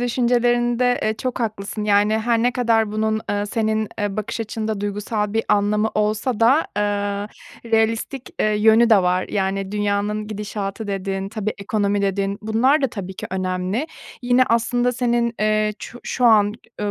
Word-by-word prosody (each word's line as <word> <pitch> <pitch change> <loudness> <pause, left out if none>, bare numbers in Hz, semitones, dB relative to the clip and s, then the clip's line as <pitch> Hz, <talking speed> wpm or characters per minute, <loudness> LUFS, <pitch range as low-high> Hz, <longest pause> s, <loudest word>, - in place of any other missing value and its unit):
düşüncelerinde, 240 0 +2
eee, 220 - +1
çok 255 +1 -3
haklısın. 215 -1 -3
Yani, 210 +1 +3
her 230 0 +1
ne 245 0 +2
kadar 225 -3 +1
bunun, 220 0 0
eee, 205 0 -1
senin, 220 -1 -1
eee, 205 -2 -2
bakış 215 +2 -3
açında 220 -1 -3
duygusal 210 +1 -2
bir 225 +1 0
anlamı 210 +1 +2
olsa 215 +3 0
da, 265 +8 +4
eee, 205 0 -1 0.4
realistik, 225 +4 0
eee, - - +3
yönü 220 +2 +4
de 215 - +8
var. 180 +1 +1
Yani, 195 -1 -2
dünyanın 210 +1 -1
gidişatı 210 0 -5
dedin, 195 0 -3
tabii, 215 0 -3
ekonomi 200 0 0
dedin, 195 0 -1
bunlar 255 +7 +2
da 270 - +4
tabii 190 -4 -6
ki - - -6
önemli. 185 - -2 0.4
Yine, 245 +1 +4
aslında 240 +2 +1
senin, 240 -1 0
eee, 215 0 +2
çu 245 - -9
şu 250 - -2
an, 210 -3 +5 0.3
eee, 205 -1 -1
215 Hz, 160 wpm, -21 LUFS, 205-235 Hz, 0.4 s, de